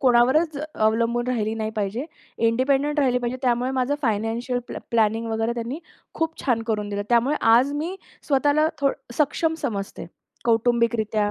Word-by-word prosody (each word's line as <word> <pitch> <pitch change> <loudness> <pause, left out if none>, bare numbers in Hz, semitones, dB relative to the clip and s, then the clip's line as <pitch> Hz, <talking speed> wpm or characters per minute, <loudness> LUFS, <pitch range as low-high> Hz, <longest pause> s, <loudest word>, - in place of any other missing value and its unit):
कोणावरच 265 +5 +4 0.2
अवलंबून 230 +2 +1
राहिली 220 -3 -1
नाही 220 -1 -3
पाहिजे. 210 +6 -2 0.4
इंडिपेंडंट 275 +5 +1
राहिली 255 -3 +2
पाहिजे. 245 +1 -3
त्यामुळे 250 +1 +1
माझं 260 +3 +1
फायनान्शियल 230 +2 -1
पॅ - - -5
प्लॅनिंग 225 0 +2
वगैरे 225 +1 0
त्यांनी 240 +5 -4 0.4
खूप 325 0 -2
छान 235 -4 +1
करून 210 -2 -1
दिलं. 205 0 -2
त्यामुळे 240 +5 +3
आज 250 +5 +5
मी 325 +6 -3 0.3
स्वतःला 290 +2 +3
थोडं 270 -3 -1
सक्षम 320 +2 +1
समजते 200 -9 -4 0.4
कौटुंबिकरित्या 225 -2 +2
240 Hz, 145 wpm, -24 LUFS, 225-275 Hz, 0.4 s, आज